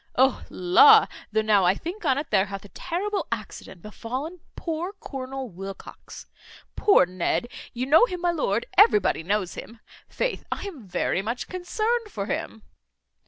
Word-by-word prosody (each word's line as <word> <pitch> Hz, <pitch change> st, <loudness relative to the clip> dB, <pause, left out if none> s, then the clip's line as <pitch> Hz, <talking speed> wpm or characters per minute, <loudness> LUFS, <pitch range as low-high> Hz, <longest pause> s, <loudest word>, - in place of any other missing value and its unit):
O 260 Hz, +1 st, +3 dB
la! 430 Hz, -, +6 dB, 0.3 s
though 220 Hz, 0 st, +1 dB
now 210 Hz, -3 st, +4 dB
I 180 Hz, +2 st, +4 dB
think 345 Hz, -, -7 dB
on't 285 Hz, +1 st, 0 dB
there 195 Hz, -2 st, +3 dB
hath 195 Hz, 0 st, -7 dB
a -, -, -13 dB
terrible 375 Hz, -, -3 dB
accident 180 Hz, -3 st, -7 dB
befallen 260 Hz, -, -6 dB, 0.2 s
poor 335 Hz, +3 st, -4 dB
Colonel 270 Hz, -2 st, -6 dB
Wilcox. 195 Hz, 0 st, -10 dB, 0.5 s
Poor 400 Hz, -, +5 dB
Ned. 185 Hz, +6 st, -1 dB, 0.2 s
You 245 Hz, +1 st, -3 dB
know 310 Hz, -, +6 dB
him, 360 Hz, -4 st, -6 dB
my 350 Hz, -1 st, +2 dB
lord, 235 Hz, -9 st, -1 dB
everybody 210 Hz, -7 st, +5 dB
knows 190 Hz, +1 st, -1 dB
him; 230 Hz, 0 st, -10 dB, 0.3 s
faith! -, -, -2 dB
I -, -, -3 dB
am 305 Hz, -, -8 dB
very 180 Hz, +1 st, -1 dB
much 230 Hz, +5 st, -4 dB
concerned 430 Hz, +5 st, -2 dB
for 200 Hz, -, -4 dB
him." 220 Hz, +1 st, -4 dB
255 Hz, 155 wpm, -25 LUFS, -, 0.5 s, la